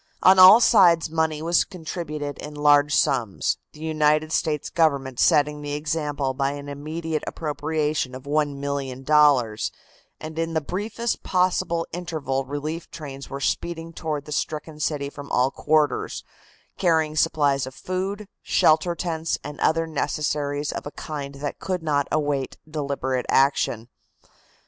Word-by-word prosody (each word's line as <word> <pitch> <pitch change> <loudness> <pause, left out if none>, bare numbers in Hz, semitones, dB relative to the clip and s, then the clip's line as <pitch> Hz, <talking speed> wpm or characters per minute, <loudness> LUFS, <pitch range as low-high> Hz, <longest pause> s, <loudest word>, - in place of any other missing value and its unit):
On 185 0 +7
all 185 +5 +10
sides 170 -8 +5
money 160 -1 0
was 170 +1 +3
contributed 155 -5 -6
in 150 0 -8
large 145 0 +4
sums, 110 -5 +1
the 150 - -15
United 155 0 +1
States 150 -2 -1
Government 140 -6 +1
setting 150 0 +3
the 145 0 -4
example 145 -2 -2
by 135 +1 -1
an 145 0 -8
immediate 155 +2 -4
appropriation 150 -3 -2
of 130 - -9
$1,000,000, 140 -3 +1 0.5
and 155 +1 -7
in 165 0 -2
the - - +3
briefest 210 +8 -3
possible 180 -2 +1
interval 155 -6 -3
relief 150 +4 -5
trains 140 -4 -8
were 140 - -5
speeding 165 +3 -2
toward 155 -3 -4
the 150 - -10
stricken 150 +1 -3
city 145 -2 -2
from 145 -1 -10
all 125 +2 +2
quarters, 155 +1 0 0.6
carrying 160 -3 +2
supplies 145 -4 +2
of 130 - -9
food, 195 +3 -4
shelter 170 +2 +3
tents 165 -2 -2
and 145 0 -8
other 165 +1 +2
necessaries 145 -2 -2
of - - -5
a - - -6
kind 145 -2 -6
that 140 +1 -5
could 185 -3 -3
not 145 -3 +1
await 145 -3 -1
deliberate 140 -4 -2
action. 135 -4 +2
150 Hz, 140 wpm, -24 LUFS, 140-160 Hz, 0.6 s, all